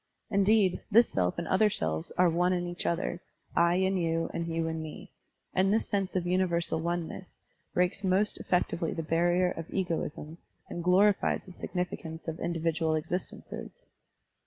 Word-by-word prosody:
Indeed, 200 -1 +3
this 230 +3 +6
self 90 -2 0
and - - -3
other 210 +3 +4
selves 80 - -2
are 180 - +5
ope 180 +1 +3
in 175 -1 -1
each 175 0 -4
other, 175 +1 -1 0.3
I 170 +1 +4
in 190 +1 +2
you 165 -1 0
and 170 0 -2
you 165 0 -1
in 160 0 -3
me; 155 -1 -8 0.4
and 190 +1 +3
f^his 220 +2 +3
sense 195 -3 -2
of 180 -2 0
universal 175 -2 +1
oneness 175 +2 -4 0.4
breaks 180 +3 +1
most 195 +2 +1
effectually 175 -2 0
the 165 - -3
barrier 175 +3 +2
of 165 0 -7
egoism 165 -3 -3 0.3
and 175 - -5
glorifies 195 +3 +3
the 190 - -11
signiftqince 175 -3 -5
of 160 0 -4
individual 165 -1 0
existences. 180 - -5
175 Hz, 160 wpm, -29 LUFS, 165-185 Hz, 0.4 s, this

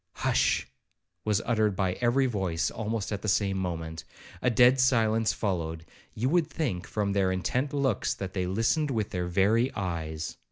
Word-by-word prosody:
Hush! - - +1 0.6
was 105 0 +1
uttered 110 -4 +1
by 95 -1 0
every 125 +3 +3
voice 95 -9 -1
almost 110 -3 -3
at 100 -2 -3
the - - -4
same 100 0 +2
moment. 80 -3 -4 0.4
A - - +3
dead 125 +2 +5
silence 115 -4 +3
followed,—you 85 +4 -4
would 165 +2 +2
think, 120 - -3
from 100 -2 -1
their 95 -2 +2
intent 125 +9 -1
looks, 135 -7 0
that 95 -1 -6
they 90 -2 -1
listened 115 - +1
with 110 -6 -1
their 90 -1 -2
very 105 +8 +2
eyes. 80 -5 -4
105 Hz, 160 wpm, -28 LUFS, 95-120 Hz, 0.6 s, dead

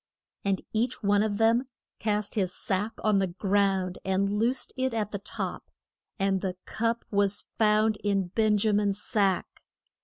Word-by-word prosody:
And 195 -1 0
each 235 +2 -1
one 205 0 +3
of 210 -1 0
them 230 +4 +3 0.3
cast 210 -1 -1
his 190 -5 0
sack 200 +5 -2
on 210 -2 +3
the 190 - +1
ground, 190 0 0
and 190 +1 +1
loosed 245 +4 0
it 260 -2 -1
at 210 -2 -1
the 200 - -3
top. 200 - -4 0.5
And 195 -1 +1
the 185 -2 -2
cup 230 +1 -1
was 200 -1 +1
found 215 0 +3
in 195 -3 0
Ben 215 +2 +2
ja 215 +1 +2
min's 205 -1 +1
sack. 200 -5 0
205 Hz, 160 wpm, -28 LUFS, 195-220 Hz, 0.5 s, one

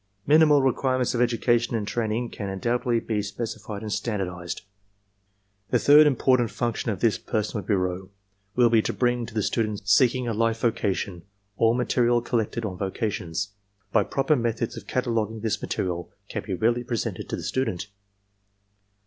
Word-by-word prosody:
Minimal 150 -1 +5
requirements 130 -1 +1
of 120 - 0
education 120 0 +2
and 105 -3 -2
train 110 -2 -1
ing 120 +2 -1
can 100 -2 -5
undoubtedly 120 +5 0
be 110 -2 -2
specified 105 0 -5
and 105 -1 -3
standardized. 90 -6 -3 1.1
"The - - +3
third 150 +1 +7
important 130 -3 +3
function 120 +1 -2
of 100 -4 -3
this 115 -3 +2
personnel 105 -1 -2
bureau 95 -2 -1 0.5
will 120 -2 +4
be 115 -1 +5
to - - -2
bring 120 -1 0
to - - -11
the 110 - +1
student 105 -3 -1
seeking 125 +4 +4
a 115 - 0
life 115 +1 0
vocation 100 -5 -1 0.3
all 115 +3 +3
material 120 -1 +2
col 120 -1 +1
lected 110 +1 -3
on 95 -3 -5
vocations. 100 -2 -2 0.4
By - - +4
proper 135 +3 +1
methods 115 -2 -1
of - - -9
cataloguing 115 -3 -1
this 110 -1 -1
material 85 -2 -3 0.2
can - - -3
be 95 - -1
readily 120 +6 +1
presented 120 -3 -3
to - - -1
the - - -7
student. 105 -8 -1
115 Hz, 165 wpm, -25 LUFS, 105-120 Hz, 1.1 s, third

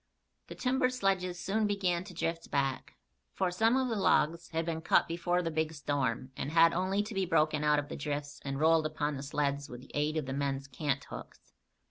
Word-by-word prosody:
The - - -8
timber 255 0 +1
sledges 190 -7 0
soon 210 +3 0
began 185 -4 0
to 195 - -10
drift 165 0 -2
back, 135 -2 -1 0.4
for 185 -1 +1
some 225 +7 +3
of 260 -1 +1
the 230 - -1
logs 170 -4 +2
had 165 0 -1
been 160 -1 -2
cut 160 - +3
before 175 +1 0
the 165 - -2
big 160 0 -1
storm, 140 -4 -1
and - - -3
had 165 +1 +5
only 190 +3 +1
to 215 - -7
be 195 -2 0
broken 155 -3 +2
out 150 0 +4
of 145 0 -1
the - - -6
drifts 145 0 -4
and 135 0 -3
rolled 160 0 +4
upon 150 -1 -2
the 135 - -5
sleds 140 0 -1
with 125 0 -8
the 135 - -15
aid 150 +2 0
of 155 - -1
the 135 - -4
men's 140 0 -2
canthooks. 140 0 -5
160 Hz, 210 wpm, -31 LUFS, 145-180 Hz, 0.4 s, had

